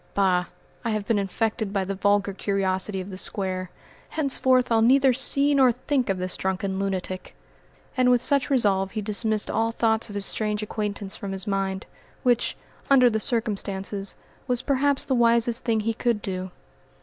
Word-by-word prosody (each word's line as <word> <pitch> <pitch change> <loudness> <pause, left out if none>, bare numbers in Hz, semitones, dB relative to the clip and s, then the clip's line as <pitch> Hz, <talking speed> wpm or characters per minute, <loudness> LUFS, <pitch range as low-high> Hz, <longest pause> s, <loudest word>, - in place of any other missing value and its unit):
Bah! 185 -3 +2 0.4
I 230 - -1
have 215 -2 -2
been 225 -3 +2
infected 215 +2 -2
by 195 -1 0
the 195 - -3
vulgar 200 0 +1
curiosity 190 0 -1
of 190 +2 -8
the 185 - -6
Square. 185 -3 -3 0.4
Henceforth 260 -4 +1
I'll 225 -1 +4
neither 265 +3 +5
see 275 +3 +2
nor 265 -3 +5
think 255 0 -1
of 195 - 0
this 185 0 -2
drunken 190 0 -2
lunatic," 185 - -4 0.6
and 255 -1 +3
with 245 -1 +5
such 280 +3 +2
resolve 195 -8 +1
he 215 - -2
dismissed 215 +1 0
all 225 0 +1
thoughts 225 -1 0
of 205 - -8
his 200 -1 -2
strange 210 0 -1
acquaintance 205 -2 -4
from 195 -1 -6
his 190 -1 -1
mind, 195 -1 -2 0.4
which, 245 -2 +1 0.3
under 255 -3 +6
the 220 - 0
circumstances, 200 -4 -2 0.3
was 250 -1 +1
perhaps 280 0 +1
the 270 - 0
wisest 235 0 +3
thing 225 -3 +1
he 225 +2 -1
could 235 -1 0
do. 185 -1 -4
215 Hz, 175 wpm, -25 LUFS, 195-240 Hz, 0.6 s, under